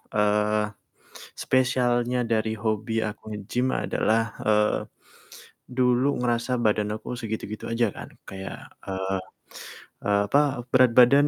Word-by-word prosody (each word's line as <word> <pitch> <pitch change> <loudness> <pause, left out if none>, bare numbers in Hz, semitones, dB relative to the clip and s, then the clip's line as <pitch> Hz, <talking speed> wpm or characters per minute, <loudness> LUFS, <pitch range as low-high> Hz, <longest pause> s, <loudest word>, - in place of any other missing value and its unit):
eee, 105 0 +2 0.7
spesialnya 125 -1 +1
dari 110 -1 0
hobi 110 +1 -1
aku 110 0 -7
nge-gym 120 +6 -1
adalah, 115 +1 +1 0.2
eee, 105 0 +3 0.9
dulu 125 +2 +2
ngerasa 120 +1 0
badan 105 -1 +1
aku 125 - -6
segitu-gitu 110 -2 -5
aja 115 -1 +2
kan - - -8 0.2
kayak, 95 0 -8 0.2
eee 95 0 -2 0.8
eee, 100 0 +3
apa, 140 -4 +2
berat 130 -2 +5
badan 140 +4 +7
115 Hz, 110 wpm, -25 LUFS, 105-125 Hz, 0.9 s, badan